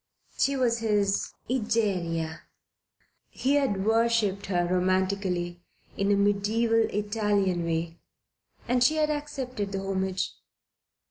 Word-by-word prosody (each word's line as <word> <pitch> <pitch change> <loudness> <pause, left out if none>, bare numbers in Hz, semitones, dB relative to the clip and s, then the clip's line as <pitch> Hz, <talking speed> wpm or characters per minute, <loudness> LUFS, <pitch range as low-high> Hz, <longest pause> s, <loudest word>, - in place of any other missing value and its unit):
She 275 - +2
was 240 -3 +1
his 205 -3 +1 0.2
Egeria. 185 -9 -1 0.9
He 270 +2 0
had 255 -10 +1
worshipped 225 -3 +2
her 175 -2 +1
romantically, 185 -1 0 0.3
in 200 +1 +1
a - - +5
mediaeval, 215 +3 +2
Italian 205 -4 0
way, 165 0 -2 0.7
and 245 0 +3
she 305 +5 +4
had 305 -1 +2
accepted 260 -8 -4
the 195 - -1
homage. 190 -1 -1
205 Hz, 110 wpm, -27 LUFS, 185-230 Hz, 0.9 s, a